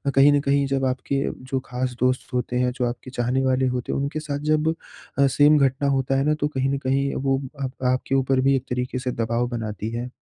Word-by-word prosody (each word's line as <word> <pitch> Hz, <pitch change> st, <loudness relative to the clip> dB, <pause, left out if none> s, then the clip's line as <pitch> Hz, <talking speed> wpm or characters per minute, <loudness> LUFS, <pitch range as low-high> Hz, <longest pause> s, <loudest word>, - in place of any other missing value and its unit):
कहीं 140 Hz, +2 st, +7 dB
न 145 Hz, -, +4 dB
कहीं 140 Hz, 0 st, +2 dB
जब 135 Hz, -1 st, 0 dB
आपके 130 Hz, +2 st, -1 dB, 0.3 s
जो 135 Hz, -, +1 dB
ख़ास 125 Hz, 0 st, -3 dB
दोस्त 130 Hz, +1 st, 0 dB
होते 125 Hz, 0 st, -1 dB
हैं 125 Hz, 0 st, +2 dB
जो 125 Hz, -2 st, 0 dB
आपके 125 Hz, +2 st, -8 dB
चाहने 125 Hz, +2 st, 0 dB
वाले 130 Hz, 0 st, +2 dB
होते 125 Hz, -1 st, -2 dB
हैं, -, -, -1 dB
उनके 140 Hz, +2 st, -2 dB
साथ 145 Hz, -2 st, -4 dB
जब 155 Hz, +1 st, +2 dB, 0.5 s
अ, 140 Hz, -, +6 dB
सेम 145 Hz, +3 st, +5 dB
घटना 140 Hz, 0 st, +2 dB
होता 135 Hz, -1 st, +1 dB
है 135 Hz, -, +2 dB
ना 150 Hz, -, +3 dB
तो 145 Hz, -, +2 dB
कहीं 135 Hz, -2 st, -1 dB
न -, -, 0 dB
कहीं 135 Hz, +1 st, 0 dB
वो 135 Hz, 0 st, 0 dB, 0.2 s
आप 130 Hz, -, -2 dB, 0.2 s
आपके 130 Hz, +1 st, -1 dB
ऊपर 135 Hz, 0 st, +2 dB
भी 135 Hz, +1 st, +3 dB
एक 130 Hz, -, -1 dB
तरीके 125 Hz, +1 st, -2 dB
से 125 Hz, 0 st, -2 dB
दबाव 115 Hz, +1 st, -1 dB
बनाती 110 Hz, -2 st, -4 dB
है। 120 Hz, +2 st, -4 dB
130 Hz, 235 wpm, -23 LUFS, 125-140 Hz, 0.5 s, कहीं